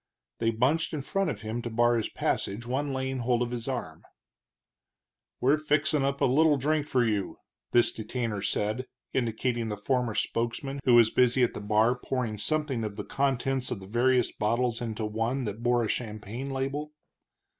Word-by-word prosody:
They 115 - +2
bunched 135 +9 +1
in 145 - -4
front 195 +4 0
of 110 -8 -4
him 110 +2 -3
to 120 - -4
bar 120 +1 +3
his 110 -2 -1
passage, 105 +5 -2
one 135 +4 -1
laying 130 0 -2
hold 120 0 +1
of 120 - -4
his 120 0 -5
arm. 115 -12 -4 1.4
"We're 140 +4 +3
fixin' 150 -1 +1
up 140 0 -1
a - - +5
little 145 +3 +4
drink 150 +2 0
for 125 -4 +2
you," 105 -4 -1 0.3
this 120 -1 +4
detainer 110 -2 -3
said, 105 +5 -1 0.3
indicating 120 -1 -1
the 105 - -3
former 120 +1 0
spokesman, 120 +4 -2
who 125 -2 +6
was 115 -2 +6
busy 125 0 +4
at 120 - +2
the - - -6
bar 110 +3 +3
pouring 125 -4 -3
something 145 0 0
of 105 -2 -4
the - - -5
contents 135 -1 0
of 115 - -3
the 95 - -10
various 120 +4 +2
bottles 120 +2 0
into 110 -2 -3
one 115 +5 -1
that 105 0 -5
bore 120 0 +2
a - - -1
champagne 110 +3 -4
label. 140 +3 -3
120 Hz, 180 wpm, -28 LUFS, 110-135 Hz, 1.4 s, who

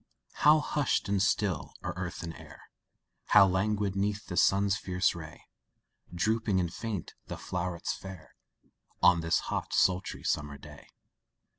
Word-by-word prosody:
How 150 +1 +7
hushed 145 -8 0
and 100 -1 +1
still 95 -7 0
are - - -3
earth 90 0 -5
and 85 -1 -5
air, 80 -2 -14 0.5
How - - +7
languid 100 +1 0
'neath 105 +2 -1
the 90 - -6
sun's 100 +2 +3
fierce 95 -1 0
ray 80 -2 -10 0.7
Drooping 105 +2 +1
and 85 -2 -2
faint 110 -7 -5
the - - -6
flowrets 90 -1 -3
fair, 95 -4 -10 0.7
On 85 -2 +6
this 80 0 +1
hot, - - -4
sultry, 95 0 +1
summer 75 -1 -1
day! - - -13
95 Hz, 140 wpm, -30 LUFS, 85-100 Hz, 0.7 s, How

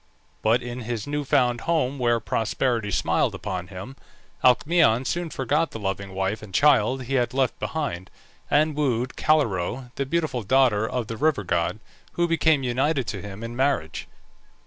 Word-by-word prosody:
But 115 +3 +2
in 120 +1 -5
his 115 -2 -4
new 145 0 -2
found 125 -4 +2
home 145 -5 0
where 120 -1 +2
prosperity 115 0 -1
smiled - - +1
upon 90 -2 -4
him, 95 +9 -9 0.5
Alcmaeon 130 -1 +4
soon 175 +4 -2
forgot 150 +4 0
the 115 - -8
loving 95 -1 -4
wife 95 +3 -1
and 110 -3 -11
child 135 0 +3
he 130 +3 -5
had 125 -1 +1
left 135 -1 0
behind, 135 - -3 0.4
and 150 +1 +3
wooed 130 -4 0
Calirrhoe, 125 - 0
the 140 - -1
beautiful 155 -5 -1
daughter 115 -1 +3
of 125 -2 -2
the 115 +1 -6
river 150 -6 +1
god, 85 +1 0 0.4
who 175 0 +1
became 160 -3 +2
united 130 +2 0
to 100 - -4
him 105 +1 -8
in 115 +1 -6
marriage. 130 - -1
125 Hz, 165 wpm, -24 LUFS, 110-145 Hz, 0.5 s, Alcmaeon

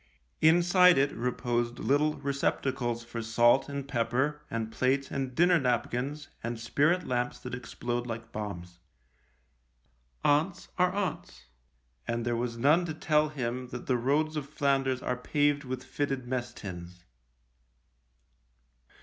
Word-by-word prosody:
Inside 175 +2 +6
it 140 +1 +3
reposed 120 0 -1
little 145 +3 +2
receptacles 135 -3 -1
for 115 0 -6
salt 120 +4 +3
and 140 -1 -4
pepper 130 +4 0
and 115 -1 -3
plates 130 +3 0
and 135 -2 -3
dinner 175 0 +5
napkins 125 +3 -1 0.2
and 115 0 -3
spirit 145 +9 +1
lamps 125 -1 -1
that 125 - -7
explode 120 0 -4
like 115 -1 -6
bombs. 90 -5 -6 1.5
Aunts 155 +5 +1
are 180 0 +4
aunts, 180 - -4 0.6
and 120 0 -1
there 120 0 0
was 115 0 -2
none 150 +8 +4
to 160 -3 -4
tell 155 -1 +2
him 125 -3 -3
that 125 0 -7
the 130 - +1
roads 145 +6 +1
of 145 -2 -4
Flanders 135 -3 0
are 125 - 0
paved 145 +2 +1
with 130 0 -4
fitted 135 -3 -2
mess 120 -1 -2
tins. 90 -5 -9
130 Hz, 130 wpm, -29 LUFS, 120-145 Hz, 1.5 s, Inside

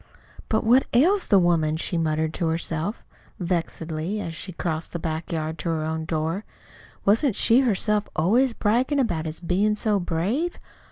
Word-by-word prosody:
"But 220 - +1
what 245 +4 +4
ails 360 +10 +4
the 200 - +5
woman?" 165 -4 +2
she 175 - -3
muttered 160 -1 0
to 170 - -1
herself, 165 +4 -2 0.4
vexedly, 170 +1 -2
as 165 -5 -4
she 185 +4 -7
crossed 165 -2 -4
the - - -1
back 160 0 -4
yard 160 -1 -3
to 160 - -3
her 160 -1 -1
own 160 0 -3
door. 165 +4 -2 0.6
"Wasn't 225 +4 +3
she 230 +3 +5
herself 210 -4 +1
always 235 +10 +3
braggin' 240 +7 +1
about 170 -11 0
his 155 +1 -5
bein' 195 +5 +1
so 210 -1 +1
brave? 195 - -1
175 Hz, 165 wpm, -24 LUFS, 160-215 Hz, 0.6 s, the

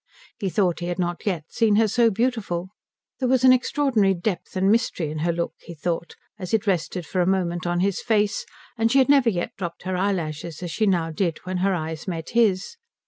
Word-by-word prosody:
He 200 -4 -1
thought 185 -3 +1
he 175 - -4
had 175 - -2
not 175 +2 -3
yet 175 -6 0
seen 220 -3 +2
her 220 +1 +4
so 230 +2 +3
beautiful. 210 -6 -1 0.5
There 255 -2 0
was 260 -1 +3
an 255 -1 +8
extraordinary 245 -6 +2
depth 175 +1 -3
and 190 +2 +3
mystery 215 -9 0
in 155 - -4
her 170 +2 +1
look, 170 0 -2
he 170 - -11
thought, 170 +2 -3 0.2
as 185 +2 -1
it 220 0 -1
rested 180 -2 -1
for 185 - -1
a 175 - +1
moment 175 -2 0
on 175 0 0
his 195 0 0
face, 210 -3 +1 0.4
and 225 0 +2
she 275 - +4
had 265 0 +4
never 275 -4 +5
yet 175 -5 -3
dropped 175 -3 -5
her 185 0 -2
eyelashes 170 -4 -2
as 175 - -4
she 215 +5 +1
now 170 -4 +1
did 165 -1 -1
when 185 0 -3
her 190 +1 +1
eyes 160 0 -5
met 165 -3 -4
his. 225 - +1
185 Hz, 220 wpm, -24 LUFS, 175-220 Hz, 0.5 s, an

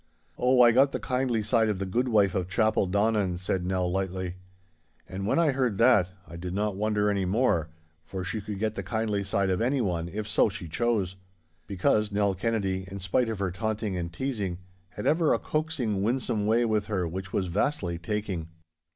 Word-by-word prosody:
'Oh, 125 0 +4
I 120 - +7
got 135 +4 +4
the - - -1
kindly 125 -3 0
side 110 0 +2
of 105 - 0
the 95 - -3
goodwife 105 -2 +2
of 90 -2 -1
Chapeldonnan,' 100 -1 +1
said 90 0 -2
Nell, 95 -1 0
lightly. 95 -1 -3 0.7
And 95 +1 -4
when - - +2
I 165 -3 +4
heard 125 -6 0
that, 115 -6 +5 0.2
I 85 - -9
did 90 +1 -5
not 105 -1 0
wonder 105 0 +1
any 100 -2 0
more, 90 -5 +1 0.3
for 95 +3 -5
she 105 +4 -2
could 105 0 -5
get 110 +1 -1
the 100 - -4
kindly 105 +1 -1
side 95 0 0
of 90 - 0
anyone, 105 -10 0
if 105 +3 -4
so 105 +1 +3
she 90 -3 -7
chose. 100 -1 0 0.5
Because 105 +2 +1
Nell 100 -1 +2
Kennedy, 95 -2 -1
in 100 - -6
spite 100 +6 0
of 110 - -3
her 95 -2 -1
taunting 110 0 -2
and 85 -1 -3
teasing, 100 -4 -3 0.3
had 105 - -7
ever 160 0 +3
a - - 0
coaxing, 150 -10 -1
winsome 110 -2 0
way 115 +2 +3
with 105 -2 0
her 95 -5 -1
which 95 +2 -6
was 95 - 0
vastly 90 - -1
taking. 95 -3 -3
105 Hz, 190 wpm, -27 LUFS, 95-115 Hz, 0.7 s, I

